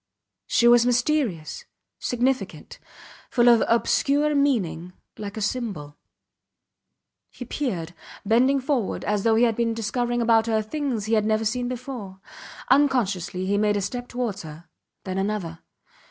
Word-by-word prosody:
She 235 - +3
was 240 0 +7
mysterious, 245 - 0 0.3
significant, 255 +2 -2 0.5
full 240 -1 +3
of 235 -2 +6
obscure 285 +5 +2
meaning 210 - 0 0.3
like 205 0 -6
a - - -3
symbol. 200 - -3 1.3
He 250 - -9
peered, 185 - -3 0.3
bending 255 +6 +3
forward, 260 -6 -1
as 210 -1 0
though 225 +1 +3
he 230 - +4
had 230 -2 +3
been 230 0 0
discovering 240 +2 -1
about 225 -1 +3
her 220 -1 +1
things 245 -3 -3
he 220 - -1
had 215 -1 +2
never 220 0 +1
seen 245 +3 -1
before. 245 -6 -7 0.5
Unconsciously 215 - +1
he 200 +1 +1
made 210 -1 +2
a - - -1
step 245 +5 -4
towards 240 -6 -3
her 160 +1 -11 0.4
then 190 0 -3
another. 195 -5 -3
230 Hz, 140 wpm, -24 LUFS, 200-250 Hz, 1.3 s, was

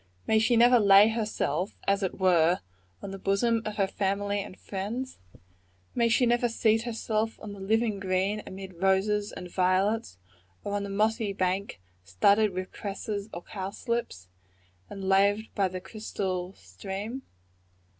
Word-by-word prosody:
May 220 - +3
she 230 +2 +3
never 240 +1 +6
lay 200 0 +7
herself, 210 -6 -2
as 200 +1 +2
it 190 - -2
were, 175 -2 +4 0.4
on 195 - -5
the 195 - -7
bosom 225 +4 +1
of 215 - -4
her 200 -2 +2
family 200 +1 -1
and 190 - -9
friends? 220 +7 -5 0.7
May 235 -1 +2
she 240 +2 +4
never 240 0 +2
seat 225 -1 +2
herself 225 -1 -2
on 210 -1 -8
the 200 - -10
living 215 +1 0
green, 195 +2 0
amid 190 -2 -9
roses 205 +2 +2
and 180 - -8
violets, 185 - +1 0.5
or 205 - -4
on 205 - 0
the 200 - -5
mossy 215 +1 0
bank 185 - -1 0.2
studded 200 - +3
with 185 0 -5
cresses 205 +1 -5
or 170 - -7
cowslips, 195 - -4 0.6
and 195 -1 -6
laved 200 +3 +2
by 195 -2 +2
the 185 0 -5
crystal 190 -3 -4
stream? 195 - -6
200 Hz, 150 wpm, -28 LUFS, 190-220 Hz, 0.7 s, lay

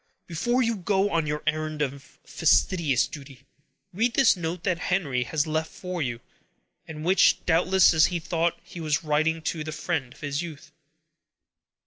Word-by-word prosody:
"Before 240 +10 0
you 230 -1 0
go 195 +2 0
on 165 -2 0
your 150 0 -3
errand 155 -1 -1
of 135 -1 -7
fastidious 160 -4 +2
duty, 135 -4 -11 0.5
read 230 +6 0
this 270 -5 +5
note 170 0 -4
that 180 -3 0
Henry 140 -10 0
has 155 +2 0
left 160 0 -2
for 180 -2 -5
you, 120 -4 -3 0.7
and 155 -1 -7
which, 185 +2 +4
doubtless, 180 +3 +4 0.2
he 180 - -2
thought 165 +1 -1
he 175 - -11
was 155 -2 -1
writing 155 +1 0
to 155 -1 -2
the 155 - -5
friend 140 -4 -3
of - - -17
his 145 0 -2
youth." 165 -4 -9
160 Hz, 160 wpm, -26 LUFS, 150-180 Hz, 0.7 s, this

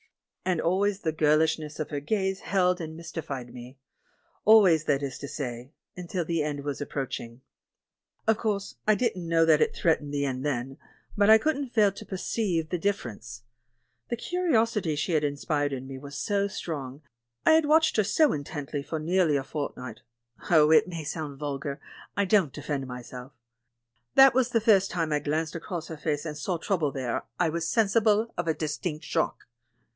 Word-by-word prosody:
And 180 -3 0
always 195 +4 +1
the 160 - 0
girl 155 -1 +3
ishness 155 -1 -1
of 155 0 -4
her 145 - -2
gaze 190 +4 -1
held 180 -2 +1
and 160 0 -6
mystified 140 -7 -6
me 125 +2 -10 0.3
— - - -29
al 220 0 +9
ways, 160 -5 +3
that 140 0 +1
is 135 -2 -4
to 140 - -6
say, 125 -2 -5 0.2
until 180 -1 -3
the 165 -1 0
end 145 -1 -3
was 145 0 -4
approach 140 -2 -3
ing. 115 +2 -11 0.9
Of 220 0 +3
course, 205 -3 -2
I 215 - +5
didn't 205 -7 -1
know 165 -1 +4
that 160 -2 +4
it - - +2
threatened 155 -3 +1
the 140 -1 0
end 130 -1 -3
then, 135 -1 -2 0.4
but 205 0 +3
I 220 - +10
couldn't 285 +1 -1
fail 215 -4 +3
to 215 - -10
preceive 185 -4 -1
the 180 - -2
differ 200 -8 -1
ence. 115 +2 -10 0.7
The 240 - -2
curiosit}^ 230 - 0
she 155 +5 -1
had 155 -2 +2
inspired 145 0 -1
in 130 -1 -5
me 135 -1 -7
was 140 +1 -8
so 200 -1 0
strong, 145 -7 -6 0.4
I - - +6
had 315 -1 +4
watched 315 +1 +4
her 215 - +4
so 285 +8 +3
intently 145 0 -4
for 160 +3 -4
near 180 +4 +2
ly 150 -3 +2
a 135 - 0
fortnight 140 -3 -6 0.3
— 115 - -15
oh, 155 -2 +6
it 160 - +6
may 170 -3 -5
sound 150 -1 -5
vulgar; 140 0 -4 0.4
I 200 - +3
don't 190 -7 +3
defend 135 -2 -4
myself 125 +1 -9 0.4
— 115 0 -49
that 270 -1 +8
the 245 -2 +2
first 200 -3 +4
time 165 -3 -1
I 150 - +2
glanced 155 +2 -2
across 170 0 -6
at 160 - -7
her - - -22
face 150 -1 -1
and 155 -2 -4
saw 170 +4 -2
trouble 165 -5 0
there 130 -3 -3 0.2
I 170 - +3
was 165 +1 -2
sensible 220 0 +2
of 175 - -3
a 160 - +1
distinct 155 +1 -4
shock. - - -1
160 Hz, 195 wpm, -27 LUFS, 145-195 Hz, 0.9 s, I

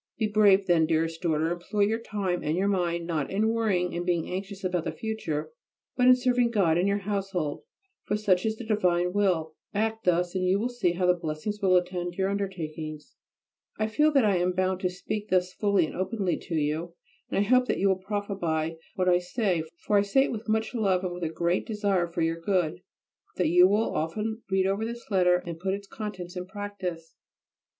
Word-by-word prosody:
Be 220 - +1
brave 205 -2 +4
then, 170 -3 +3
dearest 165 0 0
daughter; 160 -1 +1
employ 180 +4 -2
your 215 +3 +2
time 200 -6 -2
and 155 +3 -1
your 195 +2 +1
mind 175 -3 0
not 160 -5 -2
in 210 +3 +1
worrying 210 -6 0
and 175 - -2
being 175 -2 0
anxious 195 +1 -5
about 180 -2 0
the - - -1
future, 160 -9 -4 0.4
but 250 0 +3
in 255 - +9
serving 250 -1 +2
God 195 -8 +2
and 180 +3 +2
your 200 0 +2
household, 195 -7 -2 0.4
for 210 - 0
such 190 -4 +2
is 220 0 0
the 235 - -7
divine 180 -5 +1
will. 180 -6 +1 0.2
Act 220 +1 -1
thus, 175 0 +2
and 185 -1 -1
you 185 +1 +3
will 230 +4 -1
see 220 -8 0
how 180 0 +3
blessings 170 +5 -4
will 185 -2 +4
attend 175 -1 -2
your 190 +1 0
undertakings. 160 - -5 0.6
I 215 - +1
feel 300 +8 +3
that 270 -5 +4
I 200 -3 +3
am 180 +1 +1
bound 185 0 0
to 185 - 0
speak 205 +4 -5
thus 185 0 +1
fully 200 -4 +2
and - - -8
openly 190 0 -1
to 165 - -2
you, 160 +3 -1 0.3
and - - -2
I 200 +1 +2
hope 250 +1 +4
that - - 0
you 195 - +2
will 190 -1 +3
profit 205 +1 -4
by 160 -1 -1 0.2
what 185 -1 0
I 175 -1 +5
say, 180 -1 0 0.2
for 205 -1 +4
I - - +4
say 205 +7 +3
it - - -2
with 225 -1 -6
much 220 +2 0
love 195 -6 +1
and 180 -1 -2
with 175 0 -6
a 160 - 0
great 170 +2 -1
desire 200 -5 0
for 170 0 -2
your 165 +1 0
good; 175 -2 +1
and - - -15 0.6
that - - +2
you 180 +2 +7
will 210 +3 +1
often 215 +8 -2
read 190 -1 +2
over 195 +3 0
this 235 0 -6
letter 180 -2 +4
and 170 -1 -6
put 190 +2 -1
its 200 0 -9
contents 190 -4 -7
in 180 0 -5
practice. 190 -5 -6
185 Hz, 215 wpm, -27 LUFS, 175-210 Hz, 0.6 s, in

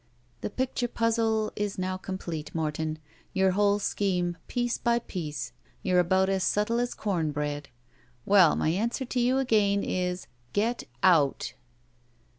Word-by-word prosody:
*'The - - -2
picture 255 +1 -1
puzzle 225 -2 +1
is 205 -1 -2
now 185 0 -1
complete, 185 -5 -5
Morton. 155 0 -1 0.4
Your 190 0 +3
whole 205 +1 +3
scheme, 180 -4 0
piece 240 0 -1
by 235 -1 +2
piece. 170 -10 -5 0.3
You're 180 -1 +3
about 190 +2 +3
as 190 -1 +1
subtle 210 +5 +1
as 245 0 -1
com 175 -7 -1
bread. 145 -1 -3 0.6
Well, 190 -6 +6
my - - +1
answer 230 - 0
to 250 +1 -2
you 250 +2 +3
again 210 -6 +2
is, 180 0 -2 0.3
'Get 230 +4 0 0.2
out!'" 155 -7 +3
195 Hz, 140 wpm, -28 LUFS, 175-230 Hz, 0.6 s, Well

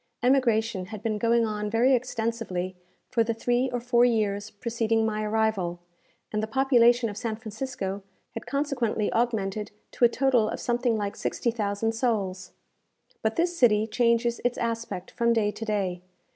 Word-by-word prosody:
Emigration 230 -6 +2
had 215 +1 -9
been 215 -2 -1
going 230 +1 +3
on 210 -1 -3
very 235 +5 +3
extensively 225 -7 -2 0.4
for 230 -2 +3
the 225 0 -2
three 245 +3 +1
or 245 - -1
four 240 0 +3
years 210 -4 +1
preceding 225 0 0
my 215 -1 -1
arrival, 210 -5 0 0.5
and 215 - -1
the 220 - -2
population 240 -1 +4
of 205 - -6
San 220 0 -3
Francisco 215 -3 -5 0.3
had - - -7
consequently 275 -7 -1
augmented 215 -3 0 0.2
to - - -3
a 240 - +8
total 250 -4 +2
of - - -4
something 240 -1 0
like 205 -1 -3
sixty 235 - -1
thousand 215 0 -1
souls. 205 -6 -2 0.7
But 220 0 0
this 345 +1 +1
city 220 -7 +4
changes 235 +1 +1
its 245 0 0
aspect 230 -5 -3
from 235 -1 +2
day 215 -2 +1
to 225 - -7
day. 195 -5 -1
225 Hz, 160 wpm, -26 LUFS, 210-240 Hz, 0.7 s, a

